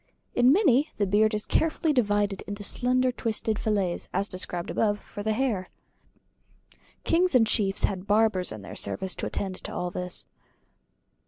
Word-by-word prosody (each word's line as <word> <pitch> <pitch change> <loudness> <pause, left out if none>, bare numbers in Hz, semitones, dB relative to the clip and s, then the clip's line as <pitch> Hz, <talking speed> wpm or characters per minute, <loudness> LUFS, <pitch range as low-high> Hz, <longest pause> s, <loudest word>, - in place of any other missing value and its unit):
In 245 +1 +5
many 300 - +4
the 205 - +2
beard 215 +3 +3
is 210 - -3
carefully 320 -1 +1
divided 205 -5 +1
into 205 +1 -5
slender 255 +4 +1
twisted 220 -2 -2
fillets, 200 -5 -1
as 195 +2 0
described 180 -2 -3
above 210 -2 +1
for 205 - -9
the 215 +1 0
hair. 215 -6 -1 1.3
Kings 355 -2 +2
and 235 -3 +6
chiefs 205 -2 +1
had 190 -1 -1
barbers 210 -3 +2
in 110 -2 -8
their - - -9
service 185 - -1
to - - -4
attend 190 -2 -3
to - - -7
all 180 0 -3
this. 180 0 -4
210 Hz, 160 wpm, -27 LUFS, 190-245 Hz, 1.3 s, and